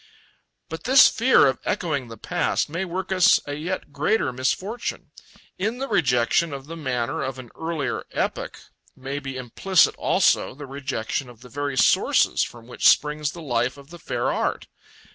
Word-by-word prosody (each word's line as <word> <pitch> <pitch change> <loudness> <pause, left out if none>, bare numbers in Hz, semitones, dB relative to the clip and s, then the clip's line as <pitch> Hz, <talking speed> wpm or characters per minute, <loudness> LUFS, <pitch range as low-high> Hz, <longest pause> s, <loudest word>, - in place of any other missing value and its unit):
But 160 - -8
this 260 +2 +8
fear 250 - +4
of 130 -2 +1
echoing 155 -10 -2
the 115 -1 -10
past - - -1
may 170 +5 -3
work 190 +2 -5
us 185 0 +5
a 145 - -5
yet 155 0 -5
greater 150 - 0
misfortune. 190 - -3 0.5
In 220 +5 -1
the 270 +2 -3
rejection 145 - +2
of 135 -1 -7
the 165 +3 -8
manner 130 -6 -2
of 130 -1 -4
an 125 -3 -10
earlier 160 -4 -3
epoch - - -3 0.4
may 135 +2 -5
be 135 -2 -6
implicit 155 +9 +2
also - - +2
the 145 +1 -8
rejection 135 -2 -4
of 120 -2 -15
the 125 - -13
very 145 +1 -3
sources - - +3
from 115 -1 -5
which 125 - +3
springs 150 0 +1
the 170 - -9
life 125 -1 -1
of 140 +2 -15
the 175 - -11
fair - - -2
art. - - -2
145 Hz, 170 wpm, -24 LUFS, 130-175 Hz, 0.5 s, this